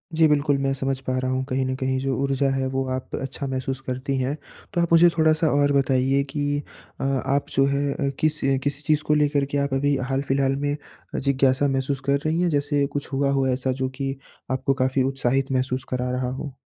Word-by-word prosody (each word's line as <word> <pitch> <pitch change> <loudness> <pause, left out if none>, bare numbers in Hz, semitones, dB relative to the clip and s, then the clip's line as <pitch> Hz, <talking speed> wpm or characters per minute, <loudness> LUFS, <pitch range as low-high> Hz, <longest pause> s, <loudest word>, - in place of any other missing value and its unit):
जी, 160 0 +5
बिल्कुल, 145 -1 +2
मैं 135 0 0
समझ 135 0 -2
पा 130 0 0
रहा 130 0 -1
हूँ, 130 0 0
कहीं 130 +1 0
न 130 0 -1
कहीं 130 -1 0
जो 135 0 -1
ऊर्जा 135 0 +1
है 135 -1 0
वो 135 0 -1
आप 130 0 -4
अच्छा 135 +1 -4
महसूस 130 0 -3
करती 130 +2 -2
हैं। 130 +3 -1 0.4
तो 175 - +2
आप 170 - 0
मुझे 170 +1 +7
थोड़ा-सा 160 0 +3
और 145 0 +3
बताइए 135 0 +2
कि 145 0 -1 0.4
अ, - - -2
आप 135 +1 0
जो 135 - +4
हैं 140 0 0
अ, 140 - -1
किस 155 0 +1 0.2
किसी 145 +1 -2
चीज़ 155 -1 +3
को 150 - +4
लेकर 145 -1 +2
के 145 - 0
आप 140 -1 0
अभी 145 +1 +2
हाल-फिलहाल 135 0 +1
में 145 0 0 0.4
जिज्ञासा 135 0 +2
महसूस 135 0 -1
कर 140 0 +2
रही 160 +2 +1
हैं 180 - +2
जैसे 145 -1 +1
कुछ 145 -1 -5
हुआ 140 +1 +1
हो 135 -1 +2
ऐसा 130 0 0
जो 130 - +1
कि 135 0 -2 0.4
आपको 130 +1 +1
काफ़ी 130 0 +2
उत्साहित 135 0 0
महसूस 130 0 0
करा 125 0 -1
रहा 125 0 -1
हो? 135 +2 -5
135 Hz, 215 wpm, -24 LUFS, 130-145 Hz, 0.4 s, मुझे